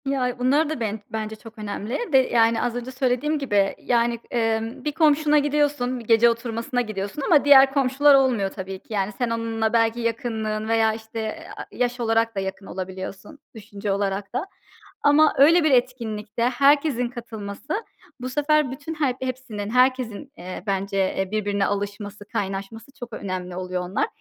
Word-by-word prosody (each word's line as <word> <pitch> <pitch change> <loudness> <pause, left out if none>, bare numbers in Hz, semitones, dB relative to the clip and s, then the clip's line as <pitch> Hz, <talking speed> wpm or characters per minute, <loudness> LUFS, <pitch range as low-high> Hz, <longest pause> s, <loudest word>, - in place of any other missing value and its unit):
Ya, 255 -2 -1
bunlar 285 +5 +2
da 315 - -3
ben 220 -1 -2
bence 220 0 -4
çok 225 +1 -14
önemli 210 +3 -4
ve, - - +8
yani, 230 -1 +3
az 245 -1 -1
önce 245 +1 -5
söylediğim 260 +4 0
gibi, 205 -8 +1
yani, 235 -1 +1
eee, 225 -2 +1
bir 235 +6 -4
komşuna 300 0 +3
gidiyorsun, 290 -4 0
bir 230 - -11
gece 230 +1 +5
oturmasına 230 +1 -2
gidiyorsun 215 +3 -4
ama 290 0 +4
diğer 270 -1 +7
komşular 275 +1 +4
olmuyor 250 -8 +2
tabii 190 0 -7
ki. 220 - -11
Yani, 195 0 0
sen 245 -2 0
onunla 225 -1 -1
belki 230 0 +2
yakınlığın 220 -2 -2
veya, 225 -1 +3
işte, 220 0 -6
aaa, - - -6
yaş 245 0 -1
olarak 225 -1 +1
da - - -1
yakın 190 +1 -5
olabiliyorsun, 190 +9 -7 0.2
düşünce 205 -1 -5
olarak 200 +1 -2
da. 255 +8 -1 0.6
Ama 295 +2 +5
öyle 325 +5 +6
bir 310 - +3
etkinlikte 235 -4 0
herkesin 275 0 +3
katılması, 235 - -6 0.4
bu 255 +1 -4
sefer 295 0 +2
bütün 290 +4 -6
her 290 -5 0
hepsinin, 255 -5 -4
herkesin, 255 +1 +1
eee, 180 0 -7
bence, 195 0 -1 0.2
eee, 190 0 -2
birbirine 205 -2 0
alışması, 205 +1 -4
kaynaşması 200 +5 -5
çok 245 -2 -8
önemli 185 -2 -5
oluyor 180 0 -3
onlar. 200 - 0
230 Hz, 165 wpm, -23 LUFS, 205-260 Hz, 0.6 s, ve